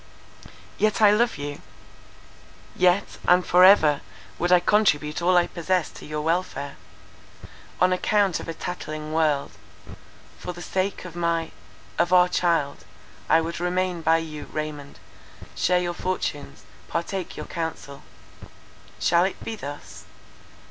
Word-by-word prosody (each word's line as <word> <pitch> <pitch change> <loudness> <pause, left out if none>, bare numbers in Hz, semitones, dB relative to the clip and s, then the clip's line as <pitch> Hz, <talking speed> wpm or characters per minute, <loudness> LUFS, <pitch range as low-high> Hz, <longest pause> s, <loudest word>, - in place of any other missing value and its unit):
"Yet 215 -1 +2
I 210 -2 +7
love 235 0 +2
you. 145 0 -6 1.1
Yet, 180 +2 +2
and 180 0 +5
for 180 +1 +5
ever, 155 -7 +6 0.4
would 175 +1 0
I 180 - +7
contribute 175 -6 +2
all 180 +1 +4
I 175 - +4
possess 180 0 -1
to - - -12
your 150 0 -3
welfare. 160 -3 -2 1.0
On 185 0 +4
account 195 0 +1
of - - -8
a 165 - -4
tattling 155 -3 -6
world; 155 -3 +1 0.9
for 180 - -6
the 175 - -10
sake 190 0 -2
of 175 -2 -9
my—of 165 - -3
our 180 -1 +6
child, 165 -6 0 0.5
I 160 +1 +5
would 165 +1 -4
remain 180 0 -1
by 160 0 +4
you, 155 -2 -6
Raymond, 150 -2 -5 0.6
share 180 0 +2
your 175 -1 -2
fortunes, 170 -6 -4 0.2
partake 175 +2 -4
your - - -5
counsel. 160 -4 -6 1.0
Shall 170 +1 +3
it 190 - -5
be 225 - -4
thus? 145 -7 -9
170 Hz, 135 wpm, -24 LUFS, 155-185 Hz, 1.1 s, I